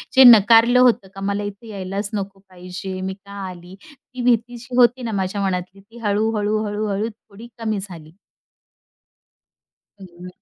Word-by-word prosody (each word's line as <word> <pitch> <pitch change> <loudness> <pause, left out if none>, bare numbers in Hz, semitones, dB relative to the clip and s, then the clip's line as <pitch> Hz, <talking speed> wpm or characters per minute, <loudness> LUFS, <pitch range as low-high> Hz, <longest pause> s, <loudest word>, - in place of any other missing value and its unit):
जे 265 - +8
नकारलं 230 +1 +7
होतं 240 -6 +3
का, 195 - -8
मला 200 +1 -2
इथे 205 +3 -8
यायलाच 200 0 -4
नको 195 -1 -5
पाहिजे, 185 +1 -7
मी 190 0 -3
का 200 +1 -15 0.2
आली? 180 +1 -12
ती 255 -3 -11
भीती 240 0 +1
जी 245 +1 -9
होती 245 +1 +4
ना 225 - -3
माझ्या 190 +2 -3
मनातली 185 +1 -3
ती 230 +4 -18
हळू-हळू, 210 0 0
हळू-हळू 210 +1 -2
थोडी 220 +1 -15
कमी 220 -3 -2
झाली. 165 -5 -10 1.9
हं. 180 -1 -12
205 Hz, 150 wpm, -21 LUFS, 190-230 Hz, 1.9 s, जे